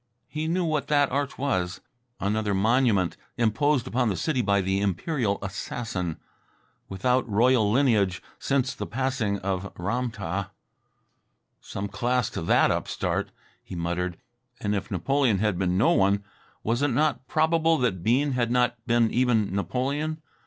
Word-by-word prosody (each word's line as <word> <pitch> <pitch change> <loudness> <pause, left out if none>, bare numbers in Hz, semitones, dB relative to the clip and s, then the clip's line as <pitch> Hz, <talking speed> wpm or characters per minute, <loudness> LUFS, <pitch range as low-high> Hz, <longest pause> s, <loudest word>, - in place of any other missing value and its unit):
He 155 +1 -3
knew 175 +2 +1
what 155 -3 -1
that 145 -2 +3
arch 140 +1 -1
was 95 -10 -1 0.4
another 105 0 0
monument 110 -3 +2 0.2
imposed 120 +4 +2
upon 125 -1 0
the 100 - -1
city 130 - 0
by 100 -2 +2
the 95 +1 0
imperial 100 - 0
assassin 95 -3 -4 0.7
without 125 +6 0
royal 110 0 +3
lineage 110 -8 +2 0.2
since 135 -1 0
the 105 - -5
passing 120 -4 -1
of 95 0 -2
Ram 115 +8 -1
tah. 100 -3 -4 1.1
"Some 100 +1 -5
class 120 +4 0
to - - -4
that 80 - +4
upstart!" - - -1 0.3
he - - -9
muttered. 85 +1 -2 0.4
And 105 0 -1
if 100 -2 -3
Napoleon 120 - +1
had 105 -2 0
been 90 -1 +1
no 105 - +4
one, 100 +1 +3 0.4
was 120 +4 0
it 145 - +3
not 145 0 0
probable 160 +2 +2
that 115 - 0
Bean 130 +9 +2
had 120 -2 0
not 120 -1 +1
been 115 -2 +3
even 115 -6 +2
Napoleon. 135 - -1
115 Hz, 145 wpm, -26 LUFS, 100-130 Hz, 1.1 s, that